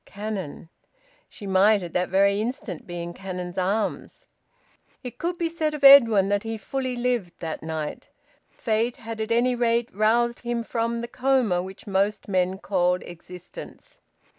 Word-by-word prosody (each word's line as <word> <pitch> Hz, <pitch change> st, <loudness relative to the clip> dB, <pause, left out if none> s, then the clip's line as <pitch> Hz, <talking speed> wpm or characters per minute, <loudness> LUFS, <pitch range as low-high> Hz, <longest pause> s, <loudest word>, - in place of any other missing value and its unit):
Cannon! 195 Hz, -6 st, -6 dB, 0.6 s
She 205 Hz, -, -11 dB
might 195 Hz, +1 st, +4 dB
at 170 Hz, -, -7 dB
that 180 Hz, 0 st, 0 dB
very 200 Hz, +1 st, +3 dB
instant 220 Hz, -7 st, -5 dB
be 175 Hz, -1 st, -5 dB
in 175 Hz, 0 st, -6 dB
Cannon's 180 Hz, -1 st, -5 dB
arms. 200 Hz, +4 st, -2 dB, 0.8 s
It 250 Hz, -2 st, -8 dB
could 345 Hz, +1 st, -2 dB
be 335 Hz, -, 0 dB
said 320 Hz, -2 st, -2 dB
of 290 Hz, -, -8 dB
Edwin 230 Hz, -8 st, +8 dB
that 205 Hz, 0 st, +1 dB
he 225 Hz, 0 st, -4 dB
fully 255 Hz, +4 st, -3 dB
lived 240 Hz, -7 st, -1 dB
that 160 Hz, -2 st, -5 dB
night. 160 Hz, -1 st, -5 dB, 0.4 s
Fate 230 Hz, 0 st, -1 dB
had 225 Hz, -1 st, -6 dB
at 220 Hz, -, -3 dB
any 240 Hz, +2 st, +3 dB
rate 235 Hz, 0 st, 0 dB
roused 235 Hz, +3 st, +2 dB
him 240 Hz, -1 st, -3 dB
from 230 Hz, 0 st, -2 dB
the 235 Hz, -, -5 dB
coma 250 Hz, -7 st, +1 dB
which 190 Hz, +3 st, -10 dB
most 200 Hz, +1 st, 0 dB
men 185 Hz, -1 st, 0 dB
called 180 Hz, -2 st, 0 dB
existence. 180 Hz, -, -11 dB
215 Hz, 160 wpm, -25 LUFS, 185-240 Hz, 0.8 s, Edwin